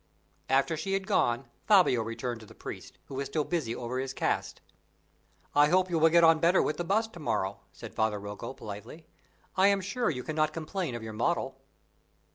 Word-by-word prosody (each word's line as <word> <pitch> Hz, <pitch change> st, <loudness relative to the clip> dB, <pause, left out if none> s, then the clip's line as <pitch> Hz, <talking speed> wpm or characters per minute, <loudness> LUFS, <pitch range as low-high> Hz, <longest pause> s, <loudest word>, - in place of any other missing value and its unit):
After 135 Hz, +5 st, +3 dB
she 195 Hz, +5 st, -3 dB
had 195 Hz, 0 st, 0 dB
gone, 135 Hz, -, +1 dB, 0.2 s
Fabio 185 Hz, -, +5 dB
returned 115 Hz, +1 st, -4 dB
to 110 Hz, -, -13 dB
the -, -, -15 dB
priest, -, -, -8 dB
who -, -, -11 dB
was 135 Hz, +1 st, -3 dB
still 155 Hz, -, 0 dB
busy 145 Hz, -9 st, -2 dB
over 125 Hz, +1 st, -3 dB
his 135 Hz, 0 st, -4 dB
cast. -, -, -1 dB, 0.9 s
"I 145 Hz, 0 st, +6 dB
hope 185 Hz, +3 st, +2 dB
you 165 Hz, -, +2 dB
will 160 Hz, +1 st, +6 dB
get 170 Hz, +1 st, +5 dB
on 165 Hz, -1 st, +6 dB
better 170 Hz, +3 st, +4 dB
with 150 Hz, -, 0 dB
the 175 Hz, -, -1 dB
bust 220 Hz, +5 st, 0 dB
to 175 Hz, -, -10 dB
morrow," 100 Hz, -, -1 dB
said -, -, -10 dB
Father 110 Hz, -1 st, 0 dB
Rocco, 105 Hz, +6 st, -7 dB
politely; 105 Hz, +10 st, -9 dB, 0.5 s
"I 190 Hz, +1 st, +5 dB
am 200 Hz, -1 st, +4 dB
sure 220 Hz, +6 st, -1 dB
you 125 Hz, -6 st, -3 dB
cannot 155 Hz, -1 st, 0 dB
complain 165 Hz, -3 st, -3 dB
of 120 Hz, -, -6 dB
your 110 Hz, -1 st, -6 dB
model." 135 Hz, +2 st, -1 dB
155 Hz, 200 wpm, -29 LUFS, 120-175 Hz, 0.9 s, I